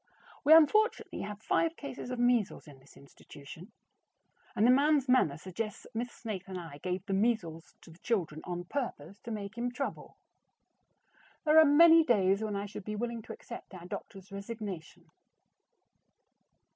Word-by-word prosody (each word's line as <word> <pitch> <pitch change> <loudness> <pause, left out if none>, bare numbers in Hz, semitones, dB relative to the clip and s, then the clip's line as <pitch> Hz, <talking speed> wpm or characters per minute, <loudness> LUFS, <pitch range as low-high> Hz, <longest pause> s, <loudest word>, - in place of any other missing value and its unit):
We 295 - +3
unfortunately 425 +8 +3
have 210 +1 -7
five 330 0 +1
cases 280 -3 -7
of 250 - -4
measles 240 -4 +1
in 140 -3 -14
this 135 - -20
institution, 150 +7 -13 0.8
and 215 - +3
the 245 - +7
man's 285 +1 +3
manner 250 - +3
suggests 195 +5 -6
that - - -17
Miss 240 +2 -3
Snaith 210 -6 -6
and 185 -1 -5
I 165 -4 -10
gave 180 +2 -3
the 195 - -3
measles 190 -6 -1
to 165 - -15
the 165 - -17
children 175 -10 -2
on 175 0 -4
purpose 200 - -5
to - - -10
make 215 0 -6
him 245 +1 -1
trouble. 275 +3 -5 1.3
There 310 +1 +7
are 315 - +8
many 325 +3 +7
days 200 -6 +2
when 215 -2 -2
I 200 +1 -3
should 205 0 -8
be 210 +2 -5
willing 235 +1 -3
to - - -9
accept 235 -4 -10
our 175 -1 -10
doctor's 195 +2 -9
resignation. 200 -4 -7
210 Hz, 165 wpm, -31 LUFS, 180-245 Hz, 1.3 s, are